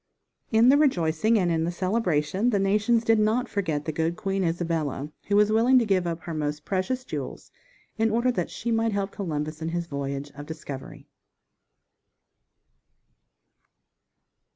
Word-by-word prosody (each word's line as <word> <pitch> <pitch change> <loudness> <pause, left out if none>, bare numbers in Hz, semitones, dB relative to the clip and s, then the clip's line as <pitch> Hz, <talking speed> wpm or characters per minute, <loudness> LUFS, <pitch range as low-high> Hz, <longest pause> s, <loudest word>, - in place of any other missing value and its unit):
"_ - - -56 0.5
In 235 +3 +6
the 280 - +6
rejoicing 215 - +2
and 180 -4 +1
in 160 -1 +1
the 170 - -1
celebration 185 0 0
the 215 - +2
nations 210 +4 +2
did 225 -1 +3
not 220 +4 +2
forget 160 -9 -2
the 160 - -1
good 165 +2 -1
Queen 195 +1 -1
Isabella, 165 -4 -2 0.2
who 205 - +1
was 210 +1 +4
willing 235 +4 +5
to 240 - +4
give 185 -4 +1
up 165 -1 -3
her 165 - -6
most 150 -1 -3
precious 205 +7 -1
jewels - - -6 0.5
in 225 0 +3
order 235 +3 +2
that - - -2
she 235 - -4
might 225 -1 +1
help 200 0 -1
Columbus 155 -4 -4
in 160 - -2
his 170 0 -2
voyage 140 -1 -4
of 145 +1 -10
discovery. 145 -4 -8
185 Hz, 160 wpm, -26 LUFS, 160-220 Hz, 0.5 s, In